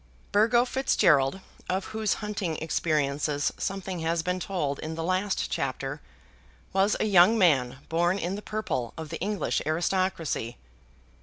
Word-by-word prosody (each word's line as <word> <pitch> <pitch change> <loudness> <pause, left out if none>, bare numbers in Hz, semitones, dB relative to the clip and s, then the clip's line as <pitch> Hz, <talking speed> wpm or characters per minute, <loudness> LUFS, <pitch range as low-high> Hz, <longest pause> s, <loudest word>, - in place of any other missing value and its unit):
Burgo 235 +4 +4
Fitzgerald, 190 - +2 0.3
of 190 +1 0
whose 220 -1 0
hunting 200 -6 -2
experiences 150 -2 0
something 190 -2 -3
has 165 0 0
been 180 +1 -1
told 170 -7 -2
in 160 +1 -5
the 165 - -3
last 185 +3 0
chapter, 135 +2 -3 0.7
was 195 +2 +3
a - - +1
young 200 +2 +6
man 135 - +3
born 175 +3 +1
in 180 -1 -2
the 205 - -5
purple 210 - -3
of 160 -1 -6
the 165 - -5
English 205 +2 -1
aristocracy. 170 -6 -1
175 Hz, 140 wpm, -27 LUFS, 150-195 Hz, 0.7 s, young